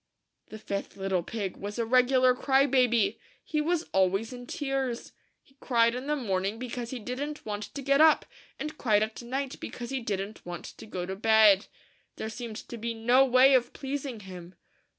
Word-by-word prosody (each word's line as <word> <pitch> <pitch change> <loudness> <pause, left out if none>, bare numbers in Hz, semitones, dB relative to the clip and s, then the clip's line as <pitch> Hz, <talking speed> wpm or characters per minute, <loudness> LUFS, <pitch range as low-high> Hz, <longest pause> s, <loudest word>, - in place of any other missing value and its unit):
The 215 - -9
fifth 200 -2 -5
little 190 -2 0
pig 200 +1 -5
was 205 +2 -6
a 230 - 0
regular 255 +1 +4
cry 270 +2 +3
baby. 240 -6 +2 0.2
He 305 -1 -1
was 335 +1 0
always 195 +5 +1
in 245 0 -9
tears. 270 -4 -3 0.3
He 270 - -28
cried 235 -2 +3
in 255 +3 -5
the 300 - +1
morning 200 -5 -1
because 245 -1 -5
he 260 - -4
didn't 270 +6 -5
want 210 -1 -4
to 280 - -4
get 275 +2 +3
up; 315 -1 +6 0.3
and 305 -1 -6
cried 215 -4 +3
at 220 +2 -5
night 265 +3 -4
because 240 0 -7
he 270 - -1
didn't 205 -2 -4
want 175 -1 -7
to - - -11
go 180 -4 -4
to 190 +1 -5
bed. 215 -1 +5 0.5
There 220 - -5
seemed 225 -1 -6
to 235 - -6
be 230 +1 -3
no 240 +4 +4
way 260 +1 +6
of 245 -2 +2
pleasing 270 -4 -5
him. 185 -2 -10
235 Hz, 190 wpm, -28 LUFS, 210-265 Hz, 0.5 s, up